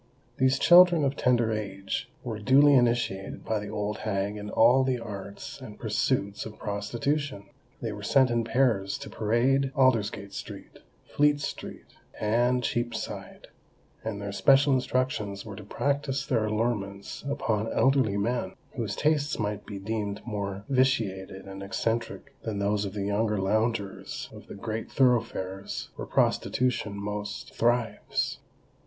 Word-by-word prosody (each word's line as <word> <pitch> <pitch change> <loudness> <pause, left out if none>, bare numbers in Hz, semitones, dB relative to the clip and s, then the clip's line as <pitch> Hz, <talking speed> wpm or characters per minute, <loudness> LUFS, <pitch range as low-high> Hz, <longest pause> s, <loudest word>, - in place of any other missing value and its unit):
These 130 0 +3
children 175 -3 +7
of 135 0 0
tender 120 -4 +2
age 100 -2 -3
were 110 -3 -4
duly 140 +6 +6
initiated 120 -6 +1
by 110 -1 0
the 105 0 -6
old 105 0 -3
hag 100 -1 -1
in 105 0 -6
all 120 +5 +5
the 130 -1 +1
arts 100 +1 -8
and 110 -5 -9
pursuits 105 -2 0
of 110 -1 -9
prostitution. 120 +4 -2 0.4
They - - -1
were - - -7
sent 130 -2 +4
in 115 -1 +1
pairs 115 -5 +1
to - - -9
parade 130 +5 +2
Aldersgate 110 -6 +2
Street, - - -8 0.3
Fleet 145 0 +2
Street, 145 - -6 0.3
and 120 +4 +2
Cheapside; 120 0 -4 0.5
and 110 -2 -3
their 100 0 -4
special 135 +6 +5
instructions 125 -6 -1
were 105 -2 -7
to 105 - -9
practise 140 +4 -1
their 115 -6 +1
allurements 105 -3 -2
upon 115 -6 -1
elderly 130 -7 +3
men, 120 +4 -1 0.2
whose 115 -6 -2
tastes 150 -1 +1
might 105 -1 -3
be 100 - -6
deemed 105 0 -3
more 100 -3 -4
vitiated 110 -8 0
and 95 0 -8
eccentric 115 +6 -2
than 110 -2 -3
those 100 +1 +1
of 95 - -5
the 100 -2 -3
younger 105 +1 +1
loungers 105 0 -1
of - - -12
the - - -8
great 110 +2 -5
thoroughfares 110 -7 0
where - - -6
prostitution 125 -5 +1
most 105 +2 -5
thrives. 120 0 0
110 Hz, 140 wpm, -28 LUFS, 100-130 Hz, 0.5 s, children